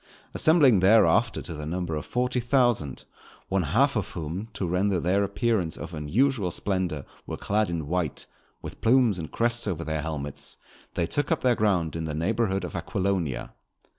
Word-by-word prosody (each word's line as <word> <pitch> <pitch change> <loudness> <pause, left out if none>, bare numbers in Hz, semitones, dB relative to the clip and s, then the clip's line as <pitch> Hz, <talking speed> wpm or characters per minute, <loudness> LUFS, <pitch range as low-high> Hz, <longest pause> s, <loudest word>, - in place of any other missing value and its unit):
Assembling 145 - +5
thereafter 110 +3 +4
to 85 - -7
the 75 -1 -6
number 85 0 -3
of 75 - -5
forty 125 0 0
thousand, 120 - +1 0.5
one 95 0 +1
half 75 -4 +2
of - - -1
whom, 85 +6 -5
to 100 - -2
render 90 +2 +1
their 95 +4 +2
appearance 100 -4 0
of 85 +1 -7
unusual 100 - +1
splendour 90 -5 -2 0.2
were - - -4
clad 105 0 0
in 85 -3 -3
white, 85 -1 -2 0.4
with - - -9
plumes 115 -5 +4
and 80 - -6
crests 120 -1 +2
over 85 -4 -2
their 80 -1 -2
helmets, 75 -3 -5 0.4
they 85 - +1
took 145 - -1
up - - +1
their 125 -1 +4
ground 95 -8 +1
in 80 -1 -3
the 75 -1 -3
neighbourhood 95 +3 0
of - - -6
Aquilonia. 90 -6 -2
95 Hz, 170 wpm, -26 LUFS, 80-115 Hz, 0.5 s, Assembling